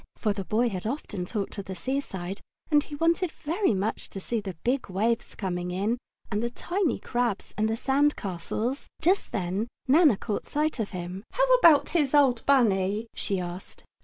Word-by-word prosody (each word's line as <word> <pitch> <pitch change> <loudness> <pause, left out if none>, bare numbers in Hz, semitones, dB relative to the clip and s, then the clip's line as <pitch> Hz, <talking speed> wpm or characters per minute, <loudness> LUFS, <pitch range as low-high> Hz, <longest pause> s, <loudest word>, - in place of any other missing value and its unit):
For 210 -2 0
the 200 -1 -4
boy 230 +5 +1
had 190 -1 -4
often 215 -8 -3
talked 205 +1 -3
of 195 - -5
the 190 - -6
seaside, 195 -5 -3 0.3
and 295 -1 +6
he 295 - -8
wanted 335 +3 +2
very 325 - 0
much 200 +4 -2
to 195 - -7
see 225 +3 -2
the 190 -3 -6
big 250 -2 0
waves 225 +5 0
coming 180 -2 -3
in, 205 +7 0 0.3
and 205 0 0
the 235 - 0
tiny 345 - -1
crabs, 240 -4 -2
and 215 +1 +1
the 225 - +1
sand 280 +4 +2
castles. 210 - -3
Just 375 +4 +2
then 195 +3 -1 0.2
Nana 290 - +6
caught 210 0 -3
sight 300 -2 0
of 215 - -1
him. 180 +1 -6
"How - - +3
about 325 -9 +6
his 295 -4 +2
old 260 -5 +4
Bunny?" 215 -5 +3
she 195 -2 -1
asked. 180 +1 -7
225 Hz, 185 wpm, -27 LUFS, 195-280 Hz, 0.3 s, and